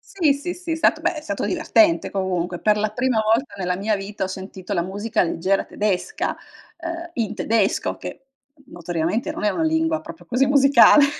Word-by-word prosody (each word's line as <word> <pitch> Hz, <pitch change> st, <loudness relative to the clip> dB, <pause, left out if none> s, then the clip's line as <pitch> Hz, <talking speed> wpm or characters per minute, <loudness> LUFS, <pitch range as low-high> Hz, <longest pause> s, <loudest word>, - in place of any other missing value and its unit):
Sì, 325 Hz, -7 st, +4 dB
sì, 290 Hz, +6 st, -4 dB
sì, 350 Hz, -1 st, -8 dB
è -, -, +2 dB
stato 320 Hz, 0 st, +2 dB
beh, 340 Hz, 0 st, 0 dB
è -, -, -4 dB
stato 310 Hz, -3 st, -4 dB
divertente, 330 Hz, -1 st, +2 dB
comunque, 180 Hz, -2 st, -2 dB
per 210 Hz, 0 st, +3 dB
la 215 Hz, +1 st, +1 dB
prima 240 Hz, +1 st, 0 dB
volta 225 Hz, +6 st, +1 dB
nella 180 Hz, -1 st, -1 dB
mia 210 Hz, +3 st, 0 dB
vita, 195 Hz, 0 st, -4 dB
ho -, -, -1 dB
sentito 190 Hz, +1 st, -7 dB
la 180 Hz, -, +1 dB
musica 205 Hz, +5 st, -1 dB
leggera 185 Hz, +3 st, 0 dB
tedesca, 210 Hz, -, -1 dB, 0.4 s
ehm, 335 Hz, 0 st, -6 dB
in 225 Hz, -6 st, -2 dB
tedesco, 220 Hz, -3 st, 0 dB
che, -, -, -8 dB, 0.3 s
n 285 Hz, -, -22 dB
notoriamente, 175 Hz, +5 st, -2 dB
non -, -, -5 dB
è 210 Hz, -, +3 dB
una 325 Hz, -, -1 dB
lingua, 320 Hz, 0 st, +1 dB
proprio, 170 Hz, +1 st, -11 dB
così 250 Hz, +8 st, +1 dB
musicale. 280 Hz, +1 st, +7 dB
220 Hz, 195 wpm, -22 LUFS, 190-315 Hz, 0.4 s, musicale